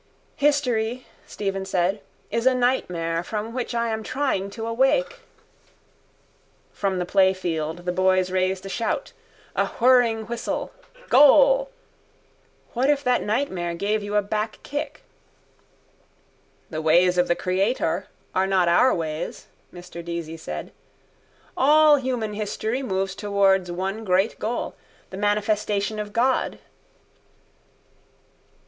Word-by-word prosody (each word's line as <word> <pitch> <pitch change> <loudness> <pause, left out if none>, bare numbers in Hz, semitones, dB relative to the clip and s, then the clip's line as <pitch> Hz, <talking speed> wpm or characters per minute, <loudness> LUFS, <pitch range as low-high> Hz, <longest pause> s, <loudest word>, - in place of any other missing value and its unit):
—History, 255 -5 +1 0.2
Stephen 195 -1 -3
said, 190 +1 0 0.3
is 230 +2 +1
a 260 - +4
nightmare 175 -10 0
from 215 +4 -5
which 250 -1 -3
I 235 0 0
am 220 0 -2
trying 255 -6 -1
to 225 +2 -6
awake. 270 - +1 1.5
From 195 -2 -1
the 180 - -1
playfield 175 -4 0
the 180 - 0
boys 185 0 +2
raised 185 0 0
a - - -5
shout. 230 - -2 0.4
A - - +1
whirring 240 -3 +4
whistle: 235 +1 -4 0.4
goal. - - +6 1.0
What 255 +4 +1
if 285 -1 +2
that 250 -2 +2
nightmare 190 -7 -1
gave 210 +4 -1
you 205 0 -4
a 210 - +3
back 215 +2 -3
kick? 290 +1 -5 1.7
—The 155 -1 -3
ways 175 +3 +4
of 180 - +3
the 175 - +2
Creator 185 -1 0 0.3
are 190 +1 +1
not 190 -2 +2
our 215 +10 +4
ways, 160 -1 -4 0.3
Mr 175 -1 -10
Deasy 170 -1 -5
said. 75 - -7 0.8
All 300 +2 +6
human 250 -5 -2
history 215 +4 -3
moves 190 -5 -2
towards 195 -3 +2
one 190 +5 -3
great 190 +2 +1
goal, 235 +3 -3 0.4
the 190 - -7
manifestation 210 0 0
of 210 0 -5
God. 250 +4 +1
205 Hz, 120 wpm, -24 LUFS, 185-245 Hz, 1.7 s, goal